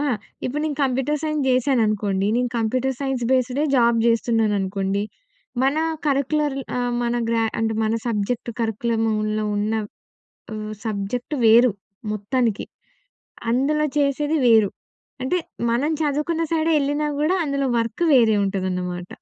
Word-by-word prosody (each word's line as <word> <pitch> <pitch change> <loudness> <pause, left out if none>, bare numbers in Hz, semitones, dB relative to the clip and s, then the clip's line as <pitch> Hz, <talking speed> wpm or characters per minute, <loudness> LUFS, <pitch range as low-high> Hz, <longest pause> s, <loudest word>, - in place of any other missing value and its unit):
ఆ! - - 0 0.4
ఇప్పుడు 290 +4 -2
నేను 295 -3 -2
కంప్యూటర్ 270 +3 0
సైన్స్ 305 -2 -1
చేశాననుకోండి. 215 -7 +1
నేను 245 0 0
కంప్యూటర్ 255 +4 0
సైన్స్ 270 -3 -2
బేస్డే 260 +3 +1
జాబ్ 235 -1 +4
చేస్తున్నాననుకోండి. 205 -4 +1 0.6
మన 275 +3 +2 0.3
కరిక్యులర్ 285 +1 +1 0.2
ఆహ్, 245 0 -1
మన 240 0 0
గ్రా 230 -1 +1 0.2
అంటే 225 0 0
మన 220 - +1
సబ్జెక్ట్ 230 +2 -1
కరిక్యులములో 220 -1 0
ఉన్న 210 +2 0 0.8
ఆహ్, 215 0 -5
సబ్జెక్టు 220 +7 -3
వేరు 235 +2 +6 0.4
మొత్తానికి. 215 +1 -1 0.8
అందులో 295 +5 +2
చేసేది 290 +2 +1
వేరు. 220 -4 +5 0.5
అంటే 310 +8 0 0.3
మనం 280 +7 +1
చదువుకున్న 300 +3 0
సైడే 325 0 +1
ఏళ్ళినా 290 +2 0
కూడా, 315 +5 +2
అందులో 280 -2 -1
వర్క్ 230 +8 -1
వేరే 230 -5 +5
ఉంటదనమాట. 180 -2 -2
240 Hz, 120 wpm, -22 LUFS, 215-280 Hz, 0.8 s, వేరు